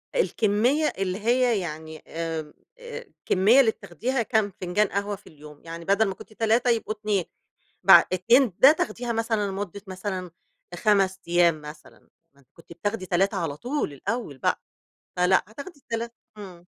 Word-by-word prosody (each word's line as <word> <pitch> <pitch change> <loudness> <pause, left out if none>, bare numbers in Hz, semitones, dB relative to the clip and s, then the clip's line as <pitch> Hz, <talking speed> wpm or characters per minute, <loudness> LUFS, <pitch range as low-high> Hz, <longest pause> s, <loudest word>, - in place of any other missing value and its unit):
الكمّية 250 - +1
اللي 190 0 -2
هي 240 0 +2
يعني 160 -2 -7
آمم، 160 -2 -5 0.3
الكمّية 455 - +1
اللي 230 -5 +5
بتاخديها 255 +3 -3
كام 215 -4 0
فنجان 185 +3 +1
قهوة 200 +1 -2
في 205 - -19
اليوم 150 -1 -14
يعني 165 0 -8
بدل 200 +3 +3
ما 195 - -2
كنتِ 215 - -14
3 230 +3 +2
يبقوا 225 -2 0
2 210 -4 -1 0.6
بع - - +9
2 235 +4 +3
ده 270 - +9
تاخديها 240 -5 -2
مثلًا 225 -2 0
لمدة 200 0 -5
مثلًا 185 -2 -5 0.4
5 195 -2 +2
أيام 170 -2 +3
مثلًا 150 -5 -13 0.3
م 140 - -23
كنتِ 170 0 -14
بتاخدي 205 +2 -3
3 195 +2 +1
على 160 -5 -3
طول 250 - -3
الأول 200 - -4
بقى - - 0 0.6
فلأ 180 +1 +3
هتاخدي 285 - -10
التلا 235 -3 -4 0.3
امم. 180 -4 -11
200 Hz, 150 wpm, -25 LUFS, 175-230 Hz, 0.6 s, بع